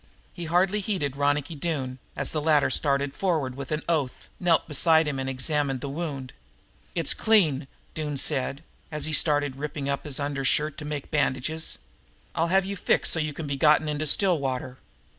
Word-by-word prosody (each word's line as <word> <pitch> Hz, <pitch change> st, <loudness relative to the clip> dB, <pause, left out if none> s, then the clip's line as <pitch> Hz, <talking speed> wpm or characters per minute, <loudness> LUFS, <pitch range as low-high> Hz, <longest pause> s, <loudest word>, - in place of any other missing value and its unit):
He 175 Hz, -, -6 dB
hardly 185 Hz, +5 st, +2 dB
heeded 185 Hz, -10 st, -2 dB
Ronicky 145 Hz, +2 st, 0 dB
Doone, 140 Hz, -5 st, -3 dB, 0.2 s
as -, -, 0 dB
the 155 Hz, -, -2 dB
latter 150 Hz, -2 st, +3 dB
started 140 Hz, -1 st, +1 dB
forward 160 Hz, -9 st, -1 dB
with 135 Hz, +2 st, -8 dB
an 155 Hz, 0 st, -2 dB
oath, 150 Hz, -7 st, -2 dB
knelt 170 Hz, -2 st, +2 dB
beside 160 Hz, +1 st, +4 dB
him 140 Hz, -2 st, -2 dB
and 135 Hz, 0 st, -3 dB
examined 135 Hz, 0 st, +1 dB
the 140 Hz, -, -5 dB
wound. 140 Hz, -5 st, -5 dB, 0.6 s
"It's 165 Hz, -4 st, +3 dB
clean," 160 Hz, -12 st, +2 dB, 0.3 s
Doone 150 Hz, -2 st, -4 dB
said, 140 Hz, +1 st, 0 dB, 0.3 s
as 150 Hz, -1 st, -1 dB
he 155 Hz, -, -2 dB
started 145 Hz, -3 st, +3 dB
ripping 145 Hz, -1 st, -5 dB
up 140 Hz, +2 st, -2 dB
his 145 Hz, -2 st, -1 dB
undershirt 145 Hz, +1 st, 0 dB
to 150 Hz, -, -7 dB
make 150 Hz, -2 st, -5 dB
bandages. 145 Hz, +2 st, 0 dB, 0.6 s
"I'll 165 Hz, -, 0 dB
have 190 Hz, +2 st, +2 dB
you 200 Hz, +1 st, -4 dB
fixed -, -, +1 dB
so 160 Hz, -, 0 dB
you 155 Hz, -1 st, -1 dB
can 150 Hz, +2 st, -7 dB
be 140 Hz, -1 st, -3 dB
gotten 150 Hz, +2 st, +4 dB
into 150 Hz, +1 st, -2 dB
Stillwater." 135 Hz, -8 st, +1 dB
150 Hz, 180 wpm, -26 LUFS, 140-160 Hz, 0.6 s, beside